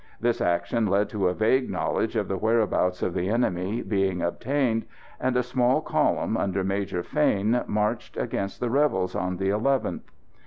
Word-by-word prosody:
This 120 Hz, +1 st, 0 dB
action 90 Hz, +5 st, +1 dB
led 100 Hz, +2 st, +2 dB
to 100 Hz, -4 st, 0 dB
a 90 Hz, -, +1 dB
vague 125 Hz, +5 st, +2 dB
knowledge 115 Hz, -, -1 dB
of 105 Hz, -3 st, 0 dB
the 95 Hz, -, -1 dB
whereabouts 105 Hz, -3 st, +1 dB
of 90 Hz, -, -1 dB
the 90 Hz, +3 st, -1 dB
enemy 105 Hz, -2 st, 0 dB
being 95 Hz, -3 st, 0 dB
obtained, 120 Hz, +5 st, 0 dB, 0.3 s
and 130 Hz, -1 st, 0 dB
a 125 Hz, -, +2 dB
small 125 Hz, +2 st, +2 dB
column, 155 Hz, -, 0 dB
under 95 Hz, -1 st, -1 dB
Major 95 Hz, -2 st, -2 dB
Fane, 120 Hz, -4 st, +1 dB
marched 105 Hz, 0 st, -1 dB
against 100 Hz, 0 st, -3 dB
the 120 Hz, -2 st, -1 dB
rebels 140 Hz, -9 st, +1 dB
on 90 Hz, +1 st, -2 dB
the 95 Hz, +1 st, 0 dB
11th. 130 Hz, +7 st, 0 dB
105 Hz, 165 wpm, -26 LUFS, 95-120 Hz, 0.3 s, led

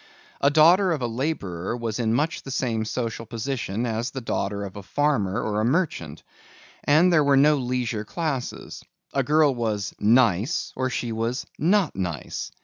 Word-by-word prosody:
A 140 Hz, -, +5 dB
daughter 170 Hz, +6 st, +5 dB
of 145 Hz, -5 st, -3 dB
a -, -, +1 dB
laborer 115 Hz, -, -3 dB
was 115 Hz, -1 st, -3 dB
in 110 Hz, -2 st, +1 dB
much 155 Hz, +5 st, 0 dB
the -, -, -10 dB
same 115 Hz, -4 st, -1 dB
social 115 Hz, 0 st, -3 dB
position 115 Hz, -2 st, -3 dB
as 115 Hz, +1 st, -2 dB
a -, -, -2 dB
daughter 100 Hz, -4 st, -2 dB
of 100 Hz, 0 st, -7 dB
a 100 Hz, -, -7 dB
farmer 105 Hz, -3 st, 0 dB
or 105 Hz, 0 st, -1 dB
a -, -, 0 dB
merchant, 120 Hz, -, -1 dB, 0.6 s
and 165 Hz, +5 st, +4 dB
there 155 Hz, -3 st, +5 dB
were 140 Hz, -1 st, +4 dB
no 150 Hz, +2 st, +5 dB
leisure 125 Hz, -4 st, -2 dB
classes. 145 Hz, 0 st, -4 dB, 0.3 s
A 135 Hz, -, +2 dB
girl 150 Hz, +1 st, +3 dB
was 110 Hz, -4 st, -2 dB
"nice" 115 Hz, -, +2 dB
or 130 Hz, 0 st, -1 dB
she 120 Hz, -2 st, -3 dB
was 115 Hz, +3 st, -2 dB
"not 185 Hz, +2 st, +2 dB
nice." 90 Hz, -5 st, -4 dB
125 Hz, 170 wpm, -24 LUFS, 110-145 Hz, 0.6 s, A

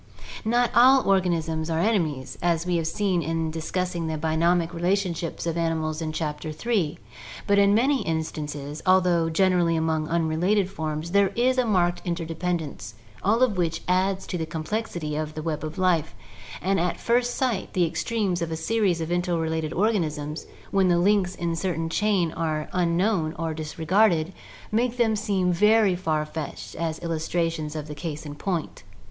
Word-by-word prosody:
Not 240 Hz, +2 st, +2 dB
all 260 Hz, +2 st, +6 dB
organisms 170 Hz, -4 st, +1 dB
are 160 Hz, -, 0 dB
enemies, 165 Hz, -, 0 dB
as 170 Hz, -1 st, +1 dB
we 180 Hz, -1 st, +1 dB
have 165 Hz, -1 st, -1 dB
seen 185 Hz, 0 st, 0 dB
in 160 Hz, 0 st, -1 dB
discussing 170 Hz, +1 st, -2 dB
the 160 Hz, -1 st, -2 dB
bionomic 165 Hz, +2 st, +1 dB
relationships 175 Hz, -2 st, -1 dB
of 165 Hz, 0 st, -1 dB
animals 160 Hz, -1 st, -1 dB
in 155 Hz, -1 st, -2 dB
Chapter 155 Hz, 0 st, -3 dB
III, 175 Hz, -1 st, -1 dB, 0.5 s
but 200 Hz, 0 st, +3 dB
in 200 Hz, 0 st, +5 dB
many 265 Hz, +4 st, +3 dB
instances, 150 Hz, -2 st, -4 dB
although 180 Hz, -3 st, +3 dB
generally 175 Hz, -1 st, +2 dB
among 160 Hz, -1 st, 0 dB
unrelated 170 Hz, +5 st, +1 dB
forms, 155 Hz, -2 st, -4 dB
there 200 Hz, +1 st, +4 dB
is 255 Hz, +2 st, +2 dB
a 250 Hz, -, +2 dB
marked 175 Hz, -4 st, +2 dB
interdependence, 165 Hz, -, -3 dB, 0.3 s
all 225 Hz, +6 st, +3 dB
of 220 Hz, -7 st, +2 dB
which 165 Hz, -2 st, -1 dB
adds 190 Hz, +1 st, +1 dB
to 180 Hz, -, -4 dB
the 160 Hz, -, -3 dB
complexity 165 Hz, -2 st, -3 dB
of 155 Hz, 0 st, -3 dB
the 155 Hz, -, -5 dB
web 155 Hz, -2 st, -3 dB
of 155 Hz, 0 st, -5 dB
life, 175 Hz, -4 st, +1 dB, 0.5 s
and 195 Hz, +2 st, +2 dB
at 175 Hz, +1 st, -1 dB
first 245 Hz, +1 st, +1 dB
sight 245 Hz, -7 st, -1 dB
the 180 Hz, -2 st, +3 dB
extremes 195 Hz, 0 st, -1 dB
of 165 Hz, -1 st, -2 dB
a -, -, -1 dB
series 185 Hz, 0 st, +1 dB
of 160 Hz, +1 st, -3 dB
interre 175 Hz, -2 st, 0 dB
lated 160 Hz, -1 st, -2 dB
organisms, 160 Hz, -7 st, -1 dB, 0.2 s
when 195 Hz, -1 st, +3 dB
the 175 Hz, -1 st, +3 dB
links 185 Hz, 0 st, +2 dB
in 170 Hz, -1 st, -2 dB
the 165 Hz, -1 st, -2 dB
chain 195 Hz, -4 st, +1 dB
are 155 Hz, -2 st, -2 dB
unknown 175 Hz, -1 st, +1 dB
or 165 Hz, -1 st, -2 dB
dis 155 Hz, -1 st, -6 dB
regarded, 175 Hz, 0 st, +2 dB, 0.4 s
make 240 Hz, +3 st, +1 dB
them 225 Hz, -3 st, +3 dB
seem 195 Hz, -4 st, 0 dB
very 210 Hz, +1 st, +4 dB
far 155 Hz, -4 st, -1 dB
fetched 155 Hz, -1 st, -6 dB
as 160 Hz, -1 st, -3 dB
illustrations 165 Hz, -1 st, -2 dB
of 150 Hz, -1 st, -5 dB
the 150 Hz, -, -6 dB
case 155 Hz, 0 st, -6 dB
in 145 Hz, -, -6 dB
point. 170 Hz, +1 st, -3 dB
170 Hz, 170 wpm, -25 LUFS, 160-195 Hz, 0.5 s, all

